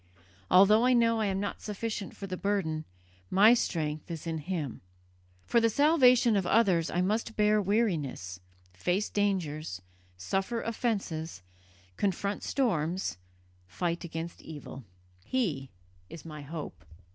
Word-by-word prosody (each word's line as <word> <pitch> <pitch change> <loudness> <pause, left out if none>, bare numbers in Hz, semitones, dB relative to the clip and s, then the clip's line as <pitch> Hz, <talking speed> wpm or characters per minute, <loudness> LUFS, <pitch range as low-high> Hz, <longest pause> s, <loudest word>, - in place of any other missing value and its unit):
Although 205 +5 +6
I 255 +1 +4
know 230 -1 +3
I 215 - +1
am 195 -1 -1
not 200 0 -4
sufficient 210 -1 -4
for 200 - -6
the 185 -1 -4
burden, 185 -6 -1 0.4
my 210 +5 +7
strength 155 -8 -1
is 165 -2 -6
in 165 -1 -2
Him. 155 -5 -4 0.6
For 235 - +3
the 230 - +4
salvation 250 -4 +5
of 190 -3 +1
others 185 -8 +3
I 175 - 0
must 220 +4 -1
bear 210 0 +3
weariness, 165 - -1 0.3
face 180 - -1
dangers, 160 - -1 0.4
suffer 195 - -2
offences, 195 - -3 0.5
confront 200 +1 -1
storms, 185 - -1 0.5
fight 170 - -2
against 165 0 -6
evil. 145 -5 -9 0.4
He 150 - -1 0.4
is 165 - -10
my 155 -2 -8
hope." 150 +2 -7
190 Hz, 130 wpm, -29 LUFS, 160-215 Hz, 0.6 s, my